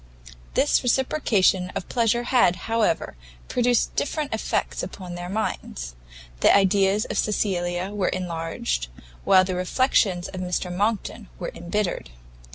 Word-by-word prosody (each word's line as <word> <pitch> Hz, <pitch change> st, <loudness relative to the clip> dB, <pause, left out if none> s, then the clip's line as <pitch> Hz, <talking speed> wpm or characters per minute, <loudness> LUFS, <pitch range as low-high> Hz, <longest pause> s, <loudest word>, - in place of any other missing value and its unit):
This -, -, +3 dB
reciprocation 230 Hz, -8 st, +2 dB
of -, -, -4 dB
pleasure 235 Hz, 0 st, +1 dB
had, 240 Hz, -8 st, +3 dB
however, 225 Hz, -, 0 dB, 0.3 s
produced 245 Hz, -1 st, +1 dB
different 295 Hz, -2 st, -2 dB
effects 220 Hz, -1 st, -1 dB
upon 180 Hz, -1 st, -7 dB
their 175 Hz, 0 st, -6 dB
minds; 60 Hz, -, -3 dB, 0.5 s
the -, -, +5 dB
ideas 195 Hz, +1 st, +3 dB
of 210 Hz, -, -2 dB
Cecilia 180 Hz, -3 st, -1 dB
were 205 Hz, -3 st, -1 dB
enlarged, 165 Hz, -, -3 dB, 0.4 s
while 185 Hz, -1 st, +6 dB
the 185 Hz, 0 st, -2 dB
reflections 185 Hz, -1 st, +1 dB
of 185 Hz, -, -6 dB
Mr 180 Hz, 0 st, -2 dB
Monckton 210 Hz, +3 st, -2 dB
were -, -, -5 dB
embittered. 180 Hz, -, -2 dB
195 Hz, 125 wpm, -24 LUFS, 180-220 Hz, 0.5 s, while